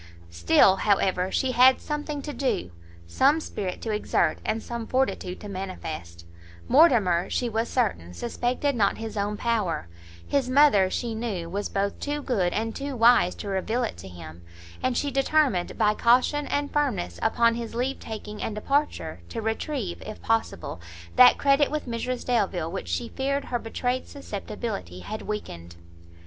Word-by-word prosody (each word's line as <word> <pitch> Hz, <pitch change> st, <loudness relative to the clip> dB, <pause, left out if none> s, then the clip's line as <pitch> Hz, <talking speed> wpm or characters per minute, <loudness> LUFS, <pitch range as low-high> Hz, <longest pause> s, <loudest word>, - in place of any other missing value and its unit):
Still, 85 Hz, -, +4 dB
however, 190 Hz, -3 st, +1 dB
she 265 Hz, -, +1 dB
had 255 Hz, +1 st, +6 dB
something 295 Hz, -1 st, -4 dB
to 295 Hz, -, -5 dB
do, 170 Hz, -, -1 dB, 0.3 s
some 275 Hz, -, +3 dB
spirit 190 Hz, -, -5 dB
to 225 Hz, -, -2 dB
exert, 210 Hz, 0 st, +1 dB
and 220 Hz, 0 st, -2 dB
some 235 Hz, -1 st, -5 dB
fortitude 255 Hz, -8 st, -1 dB
to 210 Hz, -, -7 dB
manifest; 160 Hz, -, -6 dB, 0.4 s
Mortimer, 220 Hz, -, +4 dB
she 245 Hz, -, 0 dB
was 225 Hz, 0 st, -1 dB
certain, 200 Hz, -, -1 dB
suspected 245 Hz, -, -1 dB
not 205 Hz, -4 st, +2 dB
his 225 Hz, -1 st, -6 dB
own 205 Hz, 0 st, -1 dB
power; 210 Hz, -, -1 dB, 0.4 s
his 270 Hz, -3 st, 0 dB
mother, 255 Hz, -9 st, +5 dB
she 235 Hz, +4 st, -2 dB
knew, 205 Hz, -7 st, -4 dB
was 205 Hz, +2 st, -2 dB
both 200 Hz, 0 st, -1 dB
too 290 Hz, 0 st, -3 dB
good 190 Hz, -9 st, +1 dB
and 225 Hz, +3 st, -2 dB
too 280 Hz, -1 st, -4 dB
wise 230 Hz, -6 st, +5 dB
to 210 Hz, -, -7 dB
reveal 200 Hz, +5 st, -1 dB
it 230 Hz, -, -3 dB
to 95 Hz, -, -10 dB
him, 85 Hz, -2 st, -11 dB, 0.4 s
and 255 Hz, -1 st, 0 dB
she 285 Hz, -, 0 dB
determined, 270 Hz, -, +1 dB
by 210 Hz, -, +3 dB
caution 255 Hz, +6 st, +3 dB
and 285 Hz, 0 st, -1 dB
firmness 220 Hz, -, -1 dB
upon 235 Hz, -1 st, +3 dB
his 230 Hz, -1 st, -5 dB
leave 255 Hz, +3 st, -1 dB
taking 210 Hz, -1 st, -7 dB
and 215 Hz, -, -3 dB
departure, 280 Hz, +7 st, -1 dB
to 230 Hz, -, -5 dB
retrieve, 225 Hz, -, -3 dB
if 215 Hz, -, -8 dB
possible, 225 Hz, -, -1 dB, 0.3 s
that 250 Hz, 0 st, +8 dB
credit 280 Hz, +1 st, +3 dB
with 305 Hz, 0 st, -3 dB
Mrs 245 Hz, +1 st, -3 dB
Delvile, 190 Hz, -9 st, 0 dB
which 190 Hz, -, -5 dB
she 235 Hz, -1 st, -2 dB
feared 275 Hz, +1 st, -2 dB
her 240 Hz, -, -2 dB
betrayed 245 Hz, +3 st, -2 dB
susceptibility 205 Hz, -, -6 dB
had 215 Hz, -, -6 dB
weakened. 85 Hz, -, -6 dB
225 Hz, 160 wpm, -26 LUFS, 190-260 Hz, 0.4 s, that